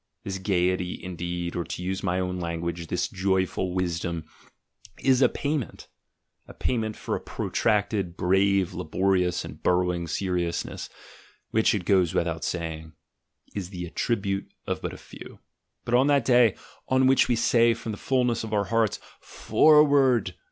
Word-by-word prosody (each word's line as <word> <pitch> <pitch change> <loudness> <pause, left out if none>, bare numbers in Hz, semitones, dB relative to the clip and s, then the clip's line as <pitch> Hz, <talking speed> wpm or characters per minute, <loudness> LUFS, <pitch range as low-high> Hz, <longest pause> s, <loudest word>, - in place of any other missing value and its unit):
This 95 -1 -4
gaiety, 90 -2 0
indeed, 85 -1 -4
or, 85 - -1
to 90 - -6
use 95 +1 -2
my 90 -2 0
own 90 0 -2
language, 85 0 -4
this 90 +7 -1
joyful 95 -3 0
wisdom, 85 -2 -2 0.8
is 130 -1 +4
a 125 - +6
payment; 145 -3 -3 0.6
a - - -12
payment 110 -3 -1
for - - -3
a - - -3
protracted, 100 -4 -1
brave, 95 0 +2
labor 95 +5 0
ious, 90 -1 0
and - - -10
burrowing 90 -1 +1
seriousness, 90 -1 -2 0.6
which, 110 0 +3
it 95 -4 -3
goes 90 -3 +2
without 85 +1 -1
ing. 80 -2 -6 0.6
is 95 -3 -4
the 90 -3 -6
attribute 100 +2 -2
of - - -3
but - - -3
a - - -9
few. - - -12 0.5
But 115 - -3
on 130 +3 +5
that 140 -4 +3
day 120 -4 +5 0.3
on 130 0 +3
which 130 0 +4
we 125 - +2
say 115 0 +3
from 115 0 -6
the 105 - -6
fullness 125 -3 +1
of 110 -1 -6
our 100 -1 +1
hearts, 115 -2 +1 0.2
"For 150 -1 +4
ward! 130 -9 +3
95 Hz, 160 wpm, -26 LUFS, 90-115 Hz, 0.8 s, a